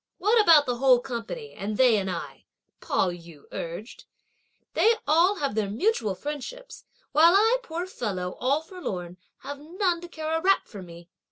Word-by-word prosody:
"What 435 +4 +4
about 325 -7 +6
the 245 -2 -2
whole 255 -1 +5
company, 260 - -6
and 205 +2 -4
they 250 -3 +5
and 190 -1 -2
I?" 175 - -6 0.3
Pao 185 - 0
yü 170 -4 -12
urged. 170 +8 -7 0.7
"They 455 +1 +4
all 335 +7 +4
have 280 - -2
their 210 -2 -1
mutual 225 - 0
friendships; 300 - -7 0.3
while 335 +4 +6
I, 450 +5 +4
poor 345 -5 -5
fellow, 195 - -4
all 275 +4 +1
forlorn, 185 - -6 0.2
have 285 +1 -7
none 345 +3 -1
to 350 - -8
care 315 -2 -3
a 325 - -1
rap 390 +2 +2
for 205 -4 -10
me." 170 -1 -12
285 Hz, 170 wpm, -26 LUFS, -, 0.7 s, about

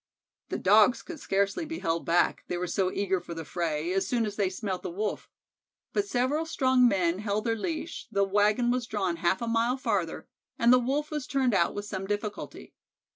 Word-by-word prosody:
The - - -2
Dogs 210 +5 +4
could 345 -4 -8
scarcely 200 - 0
be 325 +1 -5
held 165 - -2
back, 170 +1 +2
they 175 - -2
were 180 - -2
so 185 +1 0
eager 190 -2 0
for 170 - -8
the 165 -1 -6
fray, 165 +1 -2
as 195 0 0
soon 235 0 +1
as 205 -1 -4
they 200 -3 +1
smelt 190 -1 -4
the 185 - -4
Wolf. 205 +5 -3 0.6
But 405 -1 0
several 285 +3 0
strong 260 -5 +4
men 185 -4 +1
held 210 0 -1
their 230 -1 +1
leash, 320 +7 -4
the 200 - +2
wagon 210 +5 +2
was 250 -1 -1
drawn 190 -6 -1
half 175 +7 +1
a - - -2
mile 230 +3 +1
farther, 260 - -2 0.3
and 235 +1 +5
the 255 - +6
Wolf 280 +5 -1
was 300 -3 -3
turned 265 -4 +1
out 170 -3 +2
with 205 0 -4
some 195 -2 -5
difficulty. 205 +1 -5
210 Hz, 205 wpm, -28 LUFS, 190-250 Hz, 0.6 s, the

